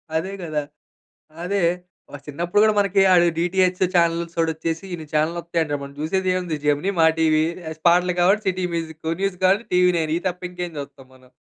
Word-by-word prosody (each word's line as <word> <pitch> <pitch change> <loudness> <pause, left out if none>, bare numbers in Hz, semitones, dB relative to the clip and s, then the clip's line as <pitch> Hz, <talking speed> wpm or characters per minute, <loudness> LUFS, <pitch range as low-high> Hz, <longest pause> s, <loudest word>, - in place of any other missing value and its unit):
అదే 185 +5 -1
గదా! 155 -3 -2 0.8
అదే 200 +1 -1 0.5
మన 145 - -7
చిన్నప్పుడు 170 +7 0
గూడా 215 -1 +4
మనకి 200 -1 +2
అది 175 -1 +5
డీటీహెచ్ 180 +1 +1
చానెల్స్‌ఓడొచ్చేసి 165 0 0
ఇన్ని 160 -2 -6
చానెల్లొత్తాయంటే 165 0 -1
మనం 140 0 -8
జూసేదేముంది 185 0 -1
జెమినీ, 150 +7 +1
మా 160 - +6
టీవీ 155 -1 +3 0.4
పాటలు 180 +1 +3
కావాలంటే 195 +4 +3
సిటీ 185 -1 -2
మ్యూజిక్కు 160 -1 -4
న్యూస్ 195 -2 -1
కావాలంటే 195 +5 +3
టీవీ 180 0 +5
నైన్ 160 -2 -1
ఇది 175 - -8
తప్ప 180 0 -9
ఇంకేం 180 -1 -5
చూస్తాం 140 -2 -10
మనం. 130 -1 -21
170 Hz, 155 wpm, -22 LUFS, 160-185 Hz, 0.8 s, మా